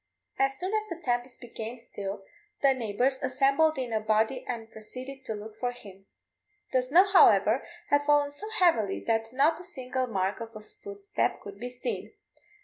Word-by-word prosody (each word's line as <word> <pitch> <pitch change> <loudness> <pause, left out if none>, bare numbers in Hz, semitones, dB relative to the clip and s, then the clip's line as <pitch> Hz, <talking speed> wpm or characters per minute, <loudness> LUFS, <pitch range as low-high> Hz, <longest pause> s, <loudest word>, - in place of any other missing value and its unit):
As 270 0 +2
soon 370 +6 -2
as 430 0 0
the 340 - -3
tempest 245 -4 -2
became 230 0 -6
still, 200 -4 -6 0.4
the 275 -1 +6
neighbours 250 +2 0
assembled 275 +4 +3
in 250 -3 -3
a 220 - +2
body 220 +4 +1
and 225 -2 -5
proceeded 255 +5 -8
to 220 - -3
look 215 +1 -9
for 245 -1 0
him. 195 -5 -13 0.7
The 255 - +4
snow, 310 +10 +5
however, 225 - +5 0.3
had 285 0 +5
fallen 290 0 +3
so 405 +10 -7
heavily 335 - +2
that 225 0 0
not 295 +6 +3
a - - -9
single 260 -7 -3
mark 195 -3 -1
of 230 -1 -8
a - - -6
footstep 200 -1 -3
could 200 0 -10
be 245 +2 -4
seen. 250 - -5
250 Hz, 175 wpm, -28 LUFS, 220-275 Hz, 0.7 s, the